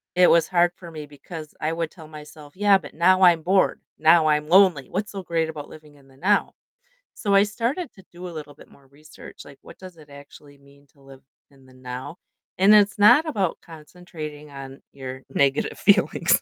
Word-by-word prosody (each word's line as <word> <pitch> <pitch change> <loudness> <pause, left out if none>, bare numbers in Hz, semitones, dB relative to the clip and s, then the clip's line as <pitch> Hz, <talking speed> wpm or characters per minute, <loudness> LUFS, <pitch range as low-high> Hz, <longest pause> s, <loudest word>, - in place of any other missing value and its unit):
it 180 0 +5
was 165 -1 +3
hard 175 -1 +2
for 175 - -12
me 155 -2 -9
because 150 +2 -11
I 155 +1 -1
would 165 -1 -3
tell 160 -4 -14
myself, 150 -1 -13
"Yeah, 200 0 +4
but 150 -7 -13
now 185 +3 +3
I'm 170 -3 +5
bored, 190 +3 +1 0.2
now 160 0 +4
I'm 150 0 +1
lonely, 180 -7 +4
what's 200 +3 -4
so 195 -2 -7
great 165 -2 -2
about 150 -2 -8
living 150 -1 -15
in 140 -1 -22
the 135 0 -22
now?" 200 +7 +1 0.6
So, 200 -3 -1
I 195 - +6
started 240 - -4
to 190 - -18
do 180 +1 -9
a - - -8
little 150 -3 -9
bit - - -18
more 140 - -22
research, 150 +3 -15
like, 140 -1 -15
what - - -15
does 185 -2 -13
it 150 -2 -17
actually 140 0 -15
mean 140 +1 -23
to 140 - -28
live 135 -1 -16 0.3
in 135 -2 -22
the 130 - -20
now? 130 +4 -8 0.4
And 195 +3 +6
it's 210 0 +3
not 210 +10 +6
about 195 - -2
concentrating 155 -2 -11
on 135 -1 -10
your 130 -1 -9
negative 135 0 0
feelings, - - +3
155 Hz, 205 wpm, -23 LUFS, 145-185 Hz, 0.6 s, I